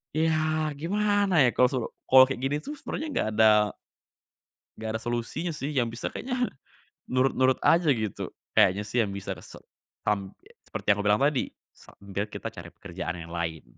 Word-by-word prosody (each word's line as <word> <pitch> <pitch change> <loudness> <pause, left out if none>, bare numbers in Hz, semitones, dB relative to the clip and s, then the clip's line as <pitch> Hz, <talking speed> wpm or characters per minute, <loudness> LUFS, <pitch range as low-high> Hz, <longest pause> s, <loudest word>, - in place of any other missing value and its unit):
ya 155 -1 +1
gimana 200 +2 +2
ya 125 - +3
kalau 125 - +5
su 130 - 0 0.3
kalau 130 0 +9
kayak 135 - -3
gini 135 +2 0
tuh 295 - -6
sebenernya 315 - -4
nggak - - 0
ada 110 -1 +7 1.3
nggak 110 0 -4
ada - - -14
solusinya 120 +8 -3
sih 145 +1 -4
yang 130 -5 +1
bisa 115 +1 -4
kayaknya, 250 -1 -2 0.6
nurut-nurut 130 0 +2
aja 165 -2 +4
gitu 110 -6 -2 0.2
kayaknya 105 -1 +4
sih 120 +2 +2
yang 100 - -4
bisa 100 0 -5
se - - -12 0.5
tam 100 -2 0 0.3
seperti - - -7
yang - - +4
aku 105 - -2
bilang 105 +1 +4
tadi 140 -1 +1 0.2
sambil 100 +1 -7
kita - - -5
cari - - -9
pekerjaan 80 - -6
yang 85 - -10
lain. 80 -2 -3
130 Hz, 170 wpm, -27 LUFS, 105-155 Hz, 1.3 s, kalau